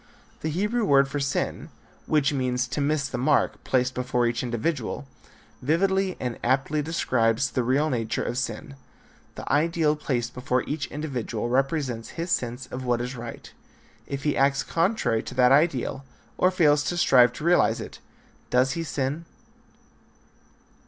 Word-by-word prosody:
The 155 - -3
Hebrew 210 +9 0
word 140 -7 +4
for 140 +1 -3
sin 135 -1 -2 0.4
(which 150 -2 +2
means 125 -2 0
to 140 +3 -2
miss 145 -1 +1
the 120 - -4
mark 140 +3 +1
placed 130 0 +1
before 125 -1 0
each 120 0 0
individual) 125 +2 -2 0.6
vividly 190 +6 +1
and 125 -2 -4
aptly 135 +4 +1
describes 130 -6 +1
the 130 - 0
real 135 +5 +2
nature 115 -3 -1
of 120 - -2
sin. 135 - -4 0.6
The - - -8
ideal 155 0 +2
placed 125 -5 -2
before 125 0 -1
each 150 0 -3
individual 125 -6 -4
represents 130 -2 -1
his 170 +2 -3
sense 125 -4 -1
of 130 +1 -5
what 120 -1 +1
is 125 +2 -4
right. 120 -1 -9 0.5
If 140 0 -5
he 150 - +1
acts 135 0 +2
contrary 165 - 0
to 125 - -9
that 125 0 +5
ideal 140 -2 +2 0.3
or 185 - +3
fails 150 -6 +3
to 175 - -2
strive 125 -7 +5
to 150 - -8
realize 175 +2 +3
it, - - -8 0.5
does 130 +1 +3
he 165 - -3
sin? 145 +1 -3
135 Hz, 155 wpm, -25 LUFS, 125-155 Hz, 0.6 s, that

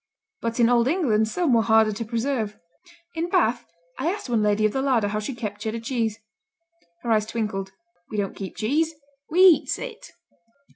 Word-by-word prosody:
But 230 +1 -3
in 235 - +5
old 240 0 +3
England 255 - +2
some 325 +3 +1
were 230 - +5
harder 220 -1 +4
to 220 +2 -4
preserve: 230 -2 -2 0.6
"In 335 +1 -2
Bath... 240 - +1 0.3
I 275 - -1
asked 400 -9 -6
one 230 -2 +2
lady 210 0 +2
of 215 - +2
the 265 - -1
larder 245 -7 +2
how 210 +1 -2
she 225 +5 -4
kept 210 -3 -5
Cheddar 225 +1 -3
cheese. 230 -3 -1 0.9
Her 235 - -1
eyes 215 -1 +2
twinkled: 210 -4 -3 0.4
'We 215 - -5
don't 200 -1 -2
keep 195 -3 -7
cheese; 305 - 0 0.3
we 345 +4 +3
eats 370 -4 +6
it.'" - - -8
230 Hz, 185 wpm, -24 LUFS, 215-275 Hz, 0.9 s, eats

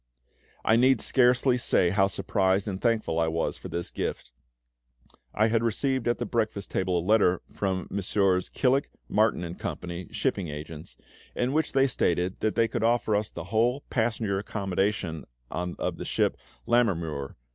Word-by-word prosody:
I 110 - +5
need 130 0 +4
scarcely 125 +1 +3
say 90 -6 +3
how 95 0 +3
surprised 95 0 0
and 95 -2 -4
thankful 110 -8 +1
I 80 - +2
was 80 0 -1
for - - -8
this 85 +1 -4
gift. - - -4 1.0
I 110 +2 +2
had 115 0 +2
received 130 +3 0
at 120 - +2
the - - -3
breakfast 110 -4 -2
table 95 -1 0
a 85 - -2
letter 100 -4 +3
from 95 -2 -1
Messrs. 95 -1 +1
Killick, 135 +1 +1 0.2
Martin 110 -4 +2
and 85 0 -7
Co., - - -3 0.3
shipping 95 -4 -1
agents, 75 +1 -8 0.4
in 125 +2 0
which 155 0 0
they 135 0 +4
stated 90 -7 0
that 110 - 0
they 115 - +3
could 115 -1 -3
offer 115 -2 +2
us 105 +1 0
the 85 - -7
whole 120 +5 +2
passenger 110 -4 0
accommodation 95 - -2 0.3
of 90 0 -3
the - - -6
ship - - +1 0.3
Lammermuir. 85 - 0
100 Hz, 160 wpm, -27 LUFS, 90-115 Hz, 1.0 s, I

